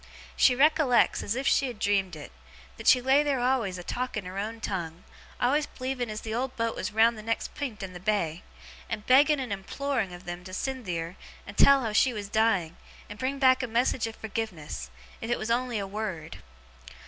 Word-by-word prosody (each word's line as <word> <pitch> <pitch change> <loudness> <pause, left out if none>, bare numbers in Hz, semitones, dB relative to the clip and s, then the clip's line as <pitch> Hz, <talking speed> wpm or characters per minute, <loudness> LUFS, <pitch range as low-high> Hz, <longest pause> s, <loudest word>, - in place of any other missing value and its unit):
She 250 - +5
recollects, 285 -3 +4
as 205 - -2
if 265 +2 -3
she 275 - +3
had 245 -3 -6
dreamed 195 -4 +1
it, 150 - -10 0.5
that - - -7
she 250 - +7
lay 265 +3 +5
there 285 -3 0
always 245 -7 +1
a 180 - -7
talking 240 -2 -3
her 185 +2 -5
own 220 +3 -4
tongue, 175 -5 -4 0.4
always 290 +4 +2
believing 255 -2 -4
as 215 0 -5
the 220 - -5
old 255 +3 -2
boat 230 0 -1
was 190 - -3
round 220 +1 +3
the - - -6
next 230 +1 -2
pint 240 -8 -5
in 185 -1 -6
the 180 - -8
bay, 180 -4 -1 0.5
and 215 -2 -4
begging 285 +3 +5
and 250 -6 -3
imploring 225 +2 -2
of 175 0 -11
'em 175 0 -5
to 185 0 -7
send 260 +2 -3
theer 170 0 -3 0.3
and 200 - -10
tell 275 +3 +6
how 220 -2 -2
she 250 +4 +4
was 205 -2 -5
dying, 205 -7 +1 0.3
and 210 - -9
bring 265 +2 -1
back 260 -1 +5
a 250 - -2
message 235 0 +1
of 225 - -7
forgiveness, 185 - -5 0.3
if 225 - -5
it 240 - +1
was 220 +1 -3
on'y 245 -1 0
a 200 - -2
wured. 190 -6 -5
225 Hz, 210 wpm, -28 LUFS, 195-255 Hz, 0.5 s, she